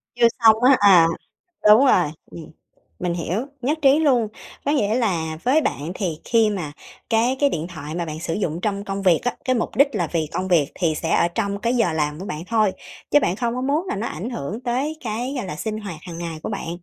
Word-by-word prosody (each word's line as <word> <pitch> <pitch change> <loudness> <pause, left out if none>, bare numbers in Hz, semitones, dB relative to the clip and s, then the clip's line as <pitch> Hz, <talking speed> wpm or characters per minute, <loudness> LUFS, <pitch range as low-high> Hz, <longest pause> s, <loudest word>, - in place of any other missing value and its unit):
Chưa 240 -1 +5 0.2
xong 220 -1 +8
á, 260 +1 +6
à, 185 -5 +7 0.6
đúng 215 +6 +8
rồi, 180 - +4 0.2
ừm. 165 - -10 0.5
Mình 175 -1 -2
hiểu, 180 - -2 0.2
nhất 295 +6 0
trí 275 +1 +5
luôn. 255 -8 +2 0.4
Có 285 - 0
nghĩa 215 -7 +1
là 170 -10 -1
với 270 +8 +3
bạn 155 - -3
thì 175 -5 -3
khi 225 -2 +3
mà 175 -8 -4 0.4
cái 235 +4 +2
cái 285 -1 +4
điện 160 - -3
thoại 155 -3 -7
mà 170 0 -2
bạn 155 -1 -6
sử 165 -1 -3
dụng 170 -4 -2
trong 200 -1 -2
công 195 0 -4
việc 180 -4 +4
á, 245 - +1
cái 255 - +1
mục 230 - -3
đích 280 +2 +5
là 180 -5 0
vì 165 -2 0
công 185 - -2
việc 165 -4 +2
thì 165 -4 0
sẽ 165 +1 -3
ở - - +3
trong 200 +2 -2
cái 235 +2 0
giờ 225 -8 +2
làm 150 -1 -1
của 190 - -5
bạn 150 -3 -5
thôi, 215 -3 +2 0.4
chứ 290 - +6
bạn 185 - 0
không 235 +1 -1
có 255 - -3
muốn 290 +7 0
là - - -2
nó 215 +4 -3
ảnh 220 +7 -5
hưởng 215 - -5
tới 265 +6 -2
cái, 240 +5 -3
gọi 245 - -3
là, 150 - -5
sinh 215 +5 -4
hoạt 200 -6 -7
hàng 170 -2 -8
ngày 165 -2 -5
của - - -4
bạn. 200 -5 -5
200 Hz, 245 wpm, -22 LUFS, 170-240 Hz, 0.6 s, xong